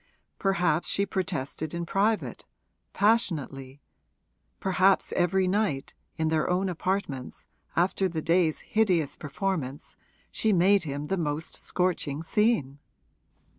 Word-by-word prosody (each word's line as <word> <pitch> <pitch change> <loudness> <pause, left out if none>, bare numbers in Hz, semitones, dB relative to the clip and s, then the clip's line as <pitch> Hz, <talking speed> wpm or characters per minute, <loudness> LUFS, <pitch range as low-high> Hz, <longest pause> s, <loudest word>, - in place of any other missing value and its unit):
Perhaps 180 -4 +1
she 200 - +2
protested 160 -4 -3
in 170 0 -3
private, 205 +5 0 0.4
passionately; 145 - 0 0.8
perhaps 190 0 +2
every 185 +2 +2
night, 185 -8 0 0.2
in 160 0 +1
their 155 -1 +1
own 185 +2 +1
apartments, 175 -7 -3 0.3
after 185 +2 +2
the 165 -2 -3
day's 165 -2 +2
hideous 185 -9 +1
performance, 145 -3 -4 0.4
she 220 -1 +1
made 190 +1 +4
him 145 0 -3
the 190 +6 -1
most 155 -1 -3
scorching 165 -5 -1
scene. 165 - +1
175 Hz, 110 wpm, -27 LUFS, 150-195 Hz, 0.8 s, made